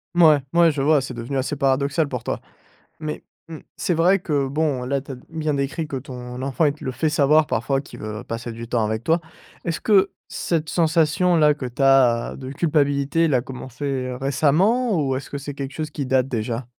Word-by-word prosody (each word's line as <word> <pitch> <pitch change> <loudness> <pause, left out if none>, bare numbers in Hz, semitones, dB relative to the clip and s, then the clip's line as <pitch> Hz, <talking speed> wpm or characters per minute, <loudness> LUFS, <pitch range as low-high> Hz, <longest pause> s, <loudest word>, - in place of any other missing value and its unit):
Mouais, 155 -4 +6
mouais, 170 -1 +5
je 145 - -5
vois, 150 0 +4
c'est 130 -1 -6
devenu 120 +4 -4
assez 135 +3 -1
paradoxal 140 +3 +1
pour 125 -4 -5
toi. - - -3 0.6
Mais, 155 -1 -4 0.3
mmh, 160 -1 -7 0.2
c'est - - -1
vrai 175 +4 +4
que, 145 -6 -1
bon, 140 -3 -1
là, 135 +1 -1
tu 135 - -8
as - - -5
d 125 - -16
bien 155 -2 -2
décrit 140 +3 -2
que 145 - -5
ton 125 -1 -7
enfant, 135 +4 0
il 145 - +3
te 150 - -16
le 130 - -1
fait 140 +5 0
savoir 150 +1 +4
parfois 135 +3 0
qu'il - - -12
veut 105 0 -6
passer 115 +1 -5
du 115 +1 -7
temps 115 -1 0
avec 110 +1 -2
toi. 165 +4 +2 0.5
Est-ce 165 -1 -2
que 200 -2 +4 0.2
cette 160 -2 -2
sensation-là 165 -1 +3
que 145 -3 -5
tu 125 +3 -4
as, 130 -4 +4
de 130 -1 -7
culpabilité, 145 +1 +1
l'a 130 -5 +2
commencé, 130 +1 -8
heu, 130 -2 -2
récemment 165 - +2
ou 130 - 0
est-ce 135 - -6
que - - -5
c'est 140 +1 -6
quelque 140 0 -6
chose 155 -1 -4
qui 140 -3 -4
date, 130 0 +2
déjà? 115 0 -3
140 Hz, 215 wpm, -22 LUFS, 130-155 Hz, 0.6 s, Mouais